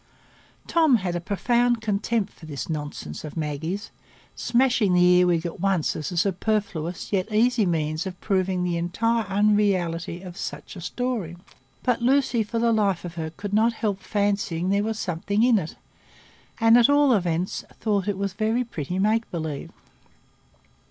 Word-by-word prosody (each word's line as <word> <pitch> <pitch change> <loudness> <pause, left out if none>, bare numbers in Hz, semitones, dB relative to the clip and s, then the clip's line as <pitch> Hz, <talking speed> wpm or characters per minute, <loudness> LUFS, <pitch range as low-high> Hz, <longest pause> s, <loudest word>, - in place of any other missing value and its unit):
Tom 320 -6 +4
had 185 -5 -1
a 175 - -2
profound 240 +5 +1
contempt 215 0 -1
for 160 - -13
this 140 -5 -5
nonsense 150 - -5
of 155 +1 -8
Maggie's, 160 +6 -3 0.4
smashing 240 -6 +2
the 180 - +5
earwig 180 -1 +4
at 170 - -5
once 190 -4 +1
as 150 - -4
a 175 - -5
superfluous 185 -2 -1
yet 195 +2 0
easy 225 -1 +3
means 155 +1 -1
of 180 -1 -7
proving 185 -2 0
the 175 -1 0
entire 225 +7 0
unreality 190 -4 +1
of 180 -1 -9
such - - -6
a 180 - -8
story; 215 -4 -3 0.5
but 245 -2 +1
Lucy, 255 -1 +2
for 220 +2 -3
the 230 0 +2
life 200 -5 +1
of 170 - -6
her, 160 -2 -4
could 200 +6 -7
not 225 +2 +3
help 210 -4 -2
fancying 200 -3 -1
there 200 +1 +2
was 220 +1 -2
something 200 +4 -1
in 240 -3 +5
it, 160 -3 -6 0.8
and 225 +1 +6
at 240 - +5
all 285 -2 +5
events 175 -3 -1 0.2
thought 205 -3 0
it 205 -2 -1
was 195 -1 -2
very 220 +4 0
pretty 180 - -5
make 215 +4 +1
believe. 160 -4 -4
195 Hz, 165 wpm, -24 LUFS, 175-225 Hz, 0.8 s, and